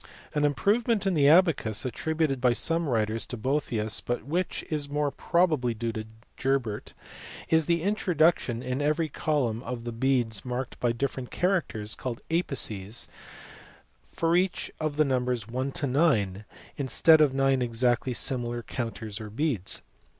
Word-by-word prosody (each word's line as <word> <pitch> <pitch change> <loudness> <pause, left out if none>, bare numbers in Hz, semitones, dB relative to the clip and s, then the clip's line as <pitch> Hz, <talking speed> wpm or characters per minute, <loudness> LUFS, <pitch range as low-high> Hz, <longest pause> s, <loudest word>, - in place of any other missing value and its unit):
An 150 - +1
improvement 210 - +1
in 195 - +2
the 145 -3 +5
abacus, 155 - +3
attributed 155 +1 -1
by 125 -1 +4
some 165 +4 0
writers 110 -1 0
to 125 - -5
Boethius 115 -3 0
but 120 -2 -2
which 175 +7 -2
is 145 -2 -1
more 145 0 0
probably 155 -11 +1
due 115 +1 -2
to 110 0 -6 0.3
Gerbert, 130 -6 -1 0.5
is 160 -1 +3
the 170 -1 +1
introduction 165 - +2
in 130 +2 -2
every 155 +2 +1
column 130 -7 -1
of 125 -2 -5 0.2
beads 120 -6 +1
marked 125 0 -4
by 120 - +2
different 130 +1 -3
characters, 165 - -1
called 120 0 -5
apices, 120 - -1 1.0
for 165 0 0
each 180 +1 0
of 155 -2 -2
the 155 - +4
numbers 125 -3 0
from 115 +3 -14
1 130 +2 -1
to 145 - 0
9 120 - +1 0.3
instead 155 +3 +5
of 140 -3 +3
nine 135 -1 +2
exactly 120 +1 +1
similar 120 -2 -1
counters 115 -4 -5
or 105 - -7
beads. 115 - -1
130 Hz, 150 wpm, -27 LUFS, 115-155 Hz, 1.0 s, the